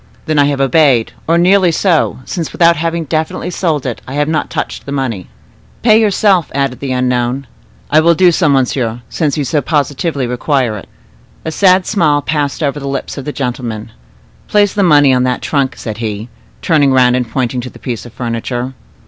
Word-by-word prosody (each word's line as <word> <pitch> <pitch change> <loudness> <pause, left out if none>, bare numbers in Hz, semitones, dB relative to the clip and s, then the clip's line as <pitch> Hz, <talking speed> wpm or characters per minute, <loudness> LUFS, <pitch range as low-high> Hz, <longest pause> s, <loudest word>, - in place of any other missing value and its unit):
"Then 155 -1 +1
I 145 - +5
have 140 -1 -1
obeyed, 135 -3 +3
or 165 +1 +3
nearly 180 +1 +4
so, 165 -6 +1
since, 170 -4 -4
without 170 0 +4
having 165 +2 -2
definitely 160 +3 -2
sold 160 -6 -1
it, 125 -3 -4
I 130 - -6
have 150 +2 0
touched - - -5
the - - -5
money." 125 -10 -3 0.6
"Pay 220 -1 +5
yourself," 200 -5 +2
added 135 -3 -1
the 135 -2 -4
unknown. 125 +1 0 0.5
"I - - +6
will 170 +1 +4
do 180 +2 +5
so, 165 -2 +2
monsieur, 125 -3 0
since 155 -3 -1
you 150 - 0
so 145 +3 0
positively 145 0 -1
require 125 -1 0
it." 100 - -10 0.6
A 160 - -2
sad 185 +1 +3
smile 150 -8 +1
passed 150 -1 -1
over 145 0 -1
the 140 - -6
lips 135 -1 -4
of 135 - -8
the 150 - -3
gentleman. 120 -5 -4 0.6
"Place 205 -2 +2
the 205 - 0
money 145 -7 +5
on 125 - +2
that 125 0 -1
trunk," 140 -3 0
said 110 -2 -6
he, 110 0 -4 0.3
turning 150 -5 +3
round 125 -1 +4
and 125 -2 -2
pointing 125 +1 -2
to 125 - -7
the - - -15
piece 120 -4 -5
of 120 - -11
furniture. 120 +2 -4
140 Hz, 190 wpm, -14 LUFS, 125-165 Hz, 0.6 s, I